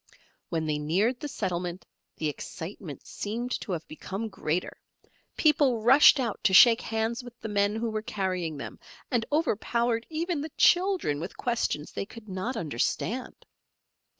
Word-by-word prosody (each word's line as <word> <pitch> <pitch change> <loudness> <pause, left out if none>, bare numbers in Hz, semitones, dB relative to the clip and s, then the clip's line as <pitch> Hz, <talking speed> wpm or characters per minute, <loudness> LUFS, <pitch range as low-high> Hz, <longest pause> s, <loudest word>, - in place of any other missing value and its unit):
When 160 -2 -1
they 150 -1 -1
neared 195 +12 +1
the 295 - -4
settlement 180 -7 -3 0.3
the 155 - -1
excitement 160 0 -7
seemed 235 +4 -4
to - - -5
have 165 -2 -4
become 195 +7 -5
greater; 175 -3 -3 0.6
people 280 -7 +3
rushed 270 +4 +8
out 235 -5 -2
to 190 -3 +5
shake 230 +3 +8
hands 225 +2 -2
with 240 -1 -12
the 225 - -5
men 205 0 +1
who 225 0 -2
were 215 0 -2
carrying 185 -7 -2
them, 140 - -7 0.3
and 230 -2 +1
overpowered 235 -5 0
even 325 0 -2
the 310 - -5
children 355 - +3
with 175 +5 -6
questions 235 - -1
they 195 - -4
could 230 -1 -12
not 195 +6 -3
understand. 205 - -2
220 Hz, 150 wpm, -28 LUFS, 180-245 Hz, 0.6 s, rushed